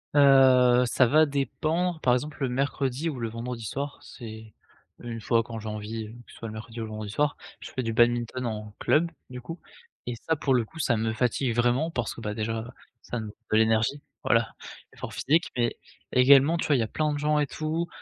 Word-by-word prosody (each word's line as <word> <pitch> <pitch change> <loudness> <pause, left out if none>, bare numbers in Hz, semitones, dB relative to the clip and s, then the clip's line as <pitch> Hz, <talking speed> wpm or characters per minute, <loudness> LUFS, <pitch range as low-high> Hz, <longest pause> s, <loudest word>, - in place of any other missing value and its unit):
Heu, 130 -3 +6
ça 125 +1 +3
va 155 +5 +5
dépendre, 155 +4 -1
par 125 - +4
exemple, 150 +4 -2
le 130 - +1
mercredi 135 +3 -1
ou 135 -5 -5
le 115 - -2
vendredi 115 +1 -5
soir, 140 +5 -4
c'est 110 -3 -10 0.5
une 115 -1 -6
fois 115 +1 +2
quand 115 -1 -7
j'ai 110 - -8
envie, 105 +1 -5 0.2
que - - -15
ce - - -15
soit 115 - -6
le 110 - -7
mercredi 110 +1 -8
ou - - -2
le 110 - -6
vendredi 110 -1 -6
soir, 145 +6 +1 0.3
je - - -9
fais 130 - -2
du 115 -1 -2
badminton 120 +2 +2
en 105 -2 -5
club, 165 +2 +2 0.2
du 125 0 -8
coup 165 +7 -8 0.5
et 120 - -3
ça 160 - +3
pour 135 -2 0
le 120 -3 +2
coup 160 - -13
ça 120 -6 +2
me 110 0 -1
fatigue 120 +1 0
vraiment 125 +6 +2
parce 120 -9 -3
que, - - -11
bah, 105 -1 -3
déjà 110 0 -2 0.4
ça 120 - -4
nous 110 - -6 0.2
de 110 - +4
l'énergie. 110 +5 +2 0.2
Voilà, - - +2 0.4
effort - - -7
physique 160 +5 +1
mais, 120 -1 0 0.3
également, 140 +5 +6
tu - - -2
vois 145 - +4
il - - +2
y - - +2
a 110 - -3
plein 155 +4 -1
de - - -2
gens 150 +1 +1
et 145 - +1
tout, 160 +4 -2
125 Hz, 225 wpm, -27 LUFS, 115-145 Hz, 0.5 s, Heu